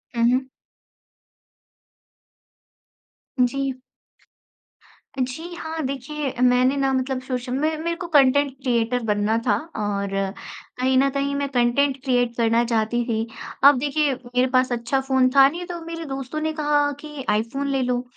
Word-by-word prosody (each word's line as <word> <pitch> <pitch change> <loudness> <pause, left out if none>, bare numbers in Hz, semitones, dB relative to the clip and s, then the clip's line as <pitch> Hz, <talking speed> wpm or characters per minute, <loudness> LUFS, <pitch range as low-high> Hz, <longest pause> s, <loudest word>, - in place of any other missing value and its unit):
हुँ, 230 - +1
हुँ। 260 +1 +1 2.9
जी। 260 +1 0 1.4
जी, 280 +8 -3
हाँ, 320 -1 -5
देखिए 275 +1 -4
मैंने 250 +2 +4
ना 270 -1 +1
मतलब 260 0 -1
सोश 255 -1 -4
म - - -2
मेरे 315 +2 -1
को 345 - -4
कंटेंट 285 -2 +4
क्रिएटर 245 -1 +1
बनना 210 +1 +1
था 205 - +4 0.2
और 200 -2 -2 0.7
कहीं 260 +1 +2
न 275 +1 +4
कहीं 280 0 -1
मैं 280 0 -1
कंटेंट 260 +2 +2
क्रिएट 245 -3 +1
करना 230 0 +3
चाहती 230 +1 0
थी। 225 -1 -1 0.4
अब 280 0 +8
देखिए 290 +1 +1
मेरे 250 0 -1
पास 255 0 +2
अच्छा 245 +3 0
फ़ोन 260 -1 +3
था 270 -1 +8
नहीं 345 +4 -6
तो 350 -1 -5
मेरे 330 0 -6
दोस्तों 270 +1 -5
ने 315 0 -1
कहा 295 -1 +1
कि 300 -3 -8
आईफोन 230 +7 -1
ले 270 -1 +1
लो। 245 -1 0
260 Hz, 145 wpm, -23 LUFS, 245-285 Hz, 2.9 s, अब